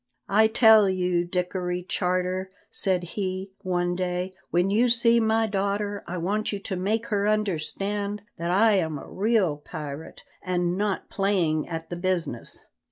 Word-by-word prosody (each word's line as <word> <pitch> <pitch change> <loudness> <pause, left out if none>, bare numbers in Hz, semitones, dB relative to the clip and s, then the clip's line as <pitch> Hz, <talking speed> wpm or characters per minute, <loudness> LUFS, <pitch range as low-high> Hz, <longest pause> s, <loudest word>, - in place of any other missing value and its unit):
"I 215 +2 +5
tell 220 -2 +6
you, 180 -2 +1
Dickory 180 0 -2
Charter," 185 0 -1 0.2
said 185 -2 +2
he, 190 +1 -4
one 175 -2 0
day, 180 0 -2 0.2
"when 180 +3 +2
you 235 +4 +3
see 235 0 +4
my 225 0 +2
daughter 200 0 -1
I 180 - -4
want 205 +5 -1
you 205 - -2
to 195 0 -5
make 210 +5 -1
her 205 -2 +1
understand 205 +1 -1 0.2
that 170 +1 -2
I 210 +5 +5
am 160 -4 -1
a - - -9
real 200 -6 +1
pirate, 150 0 -8 0.2
and 180 -1 0
not 205 0 -2
playing 180 -6 +1
at 165 0 -5
the 175 - -3
business. 175 -9 -3
185 Hz, 155 wpm, -26 LUFS, 175-205 Hz, 0.2 s, tell